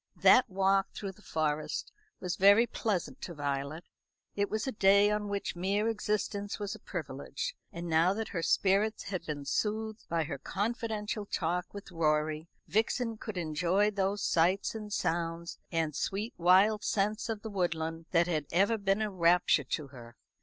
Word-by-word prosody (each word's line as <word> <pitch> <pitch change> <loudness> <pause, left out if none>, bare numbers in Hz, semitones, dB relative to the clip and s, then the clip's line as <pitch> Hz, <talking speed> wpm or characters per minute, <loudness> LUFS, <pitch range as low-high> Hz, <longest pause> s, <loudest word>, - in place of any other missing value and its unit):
That 255 - +6
walk 195 0 +2
through 200 -3 -4
the 190 - -20
Forest 155 -4 -2 0.3
was 180 -2 -2
very 200 +4 +6
pleasant 205 -6 -2
to 170 - -6
Violet. 145 +2 -3 0.5
It 200 0 0
was 215 +1 -2
a 265 - -1
day 200 -1 +5
on 210 -1 -1
which 200 -2 -3
mere 200 +5 0
existence 210 -2 -2
was 205 -1 -4
a 220 - -9
privilege; 140 -8 -5 0.2
and 170 +1 -6
now 165 +2 +4
that 220 0 -3
her 170 - -3
spirits 200 +5 +2
had 185 -3 -4
been 145 -2 -4
soothed 220 +7 -2
by 165 -1 +1
her 145 -3 -5
confidential 215 - -3
talk 180 0 -2
with 200 -2 -9
Rorie, 155 -1 0 0.2
Vixen 225 +4 0
could 215 -4 -6
enjoy 175 +5 +1
those 200 0 -1
sights 175 +4 +2
and 215 -2 -7
sounds 170 -2 -2
and 160 -3 0
sweet 205 +8 -2
wild 190 +5 +4
scents 215 +2 0
of 220 -2 -3
the 220 - -5
woodland 165 -3 -2
that 170 -1 +3
had 155 -5 -1
ever 200 +6 +3
been 200 +2 +1
a 210 - -2
rapture 170 -5 +3
to 140 +2 -3
her. 120 -3 -12
190 Hz, 165 wpm, -31 LUFS, 165-210 Hz, 0.5 s, That